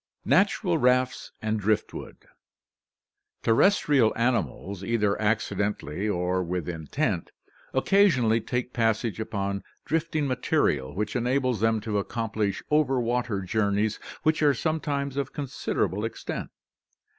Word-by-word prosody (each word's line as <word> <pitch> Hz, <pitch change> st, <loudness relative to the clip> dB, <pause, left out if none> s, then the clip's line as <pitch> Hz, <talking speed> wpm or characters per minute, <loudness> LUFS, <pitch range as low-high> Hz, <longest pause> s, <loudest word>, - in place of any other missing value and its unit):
Natural 185 Hz, -3 st, +3 dB
Rafts 125 Hz, 0 st, +2 dB
and 110 Hz, 0 st, 0 dB
Driftwood. 110 Hz, +1 st, -2 dB, 0.6 s
— -, -, -54 dB
Terrestrial 135 Hz, -, +4 dB
animals, 100 Hz, -, -1 dB
either 105 Hz, -1 st, +1 dB
accidentally 105 Hz, -4 st, -1 dB
or 90 Hz, -1 st, 0 dB
with 90 Hz, -1 st, -3 dB
intent, 80 Hz, -4 st, -2 dB, 0.4 s
occasionally 130 Hz, -, +3 dB
take 125 Hz, +3 st, -3 dB
passage 110 Hz, -1 st, 0 dB
upon 100 Hz, -2 st, -2 dB, 0.2 s
drift 165 Hz, +1 st, -1 dB
ing 150 Hz, -2 st, +2 dB
material 125 Hz, -, 0 dB
which 105 Hz, +2 st, -2 dB
enables 125 Hz, -1 st, +1 dB
them 110 Hz, +1 st, +2 dB
to 105 Hz, -1 st, -1 dB
accomplish 110 Hz, -2 st, -2 dB
over 145 Hz, -4 st, +3 dB
water 120 Hz, -3 st, -1 dB
journeys 105 Hz, +2 st, 0 dB, 0.2 s
which 155 Hz, 0 st, +2 dB
are 145 Hz, -2 st, +4 dB
sometimes 145 Hz, -3 st, -2 dB
of 140 Hz, -, -2 dB
considerable 130 Hz, -7 st, -2 dB
extent. 115 Hz, -, -4 dB
115 Hz, 115 wpm, -26 LUFS, 105-135 Hz, 0.6 s, Terrestrial